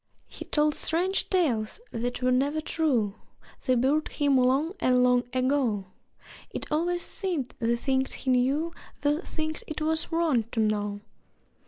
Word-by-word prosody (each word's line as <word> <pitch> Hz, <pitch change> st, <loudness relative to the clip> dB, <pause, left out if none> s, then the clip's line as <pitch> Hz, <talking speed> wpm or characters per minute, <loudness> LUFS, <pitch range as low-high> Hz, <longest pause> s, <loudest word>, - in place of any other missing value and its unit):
He -, -, -10 dB
told 300 Hz, 0 st, +2 dB
strange 360 Hz, +6 st, 0 dB
tales 270 Hz, -, +1 dB
that 245 Hz, +2 st, -3 dB
were 255 Hz, -, +3 dB
never 280 Hz, +5 st, +2 dB
true 275 Hz, -10 st, 0 dB, 0.5 s
(They 255 Hz, -, +2 dB
buried 275 Hz, +6 st, +2 dB
him 285 Hz, -2 st, +1 dB
long 265 Hz, +7 st, +3 dB
and 250 Hz, 0 st, +3 dB
long 250 Hz, 0 st, +3 dB
ago!) 255 Hz, -6 st, +1 dB, 0.6 s
It -, -, -6 dB
always 345 Hz, +3 st, +1 dB
seemed 345 Hz, -, -2 dB
the 235 Hz, 0 st, +1 dB
things 265 Hz, +1 st, 0 dB
he 265 Hz, -, -2 dB
knew 275 Hz, +7 st, +1 dB, 0.3 s
Were 295 Hz, +3 st, +2 dB
things 315 Hz, -3 st, -4 dB
it 310 Hz, -, -5 dB
was 315 Hz, +2 st, 0 dB
wrong 320 Hz, -9 st, +2 dB
to 225 Hz, -, -1 dB
know. 205 Hz, -1 st, 0 dB
270 Hz, 150 wpm, -27 LUFS, 245-315 Hz, 0.6 s, were